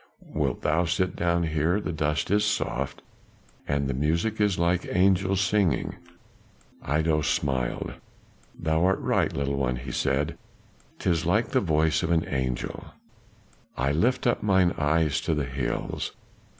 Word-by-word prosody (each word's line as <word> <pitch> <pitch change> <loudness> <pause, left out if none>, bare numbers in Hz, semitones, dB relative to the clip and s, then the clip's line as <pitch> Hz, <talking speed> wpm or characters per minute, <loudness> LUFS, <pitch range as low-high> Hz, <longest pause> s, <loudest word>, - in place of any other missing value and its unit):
Wilt - - -1
thou 80 +3 +2
sit 90 +2 0
down 85 0 +1
here? 80 +4 +1
the 95 - -3
dust 75 +1 -1
is 105 0 +3
soft, 105 0 -2 0.6
and 70 -1 0
the 70 - -1
music 85 - 0
is 105 -3 +2
like 85 +1 +1
angels 95 +1 +3
singing." 95 -4 +1 0.9
Iddo 75 +2 +1
smiled. 65 -4 -1 0.7
"Thou 80 +1 +1
art 95 +1 +3
right, - - +1
little 70 0 -2
one," 65 -2 0
he 65 +1 -6
said; 70 +5 -1 0.6
"'tis 85 -2 0
like 105 +7 +2
the 130 - +2
voice 80 -3 +2
of 80 - -1
an 85 -2 +2
angel." 65 -3 -3 0.9
"I 70 +2 +1
lift 120 - +1
up 120 - +2
mine 95 -3 +3
eyes 75 0 +1
to 80 - 0
the 75 -2 -1
hills. 65 +1 -3
80 Hz, 145 wpm, -26 LUFS, 70-90 Hz, 0.9 s, is